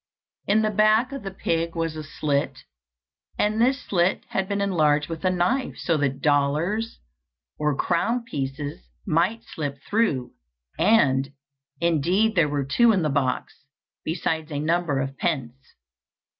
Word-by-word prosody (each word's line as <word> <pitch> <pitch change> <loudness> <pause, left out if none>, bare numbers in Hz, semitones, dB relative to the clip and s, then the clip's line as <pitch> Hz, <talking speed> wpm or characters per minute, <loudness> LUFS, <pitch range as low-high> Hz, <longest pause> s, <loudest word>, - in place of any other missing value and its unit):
In 215 +2 +3
the 215 - +1
back 215 +5 +3
of 275 -1 -5
the 195 - -5
pig 165 -3 -2
was 165 -1 -2
a 155 - -5
slit, 145 -2 -2 0.7
and 215 +2 +1
this 255 +2 +2
slit 180 0 +1
had 190 0 -1
been 200 0 -1
enlarged 155 -7 +2
with 165 +1 -6
a 185 - +3
knife, 185 +9 0
so 165 - 0
that 140 -2 -1
dollars, 155 +10 +1 0.6
or 150 -1 +1
crown 230 +8 0
pieces, 145 - -5 0.2
might 185 +8 +1
slip 145 -3 -5
through; 180 - +1 0.5
and, 135 -11 +3 0.5
indeed 170 +6 +2
there 165 -7 +3
were 145 -1 -1
two 235 - +4
in 190 -5 +1
the 155 - +1
box, 135 -1 -2 0.4
besides 160 -1 -2
a 145 - -2
number 160 -2 0
of 135 0 -3
pence. 130 -8 -1
165 Hz, 145 wpm, -24 LUFS, 145-205 Hz, 0.7 s, two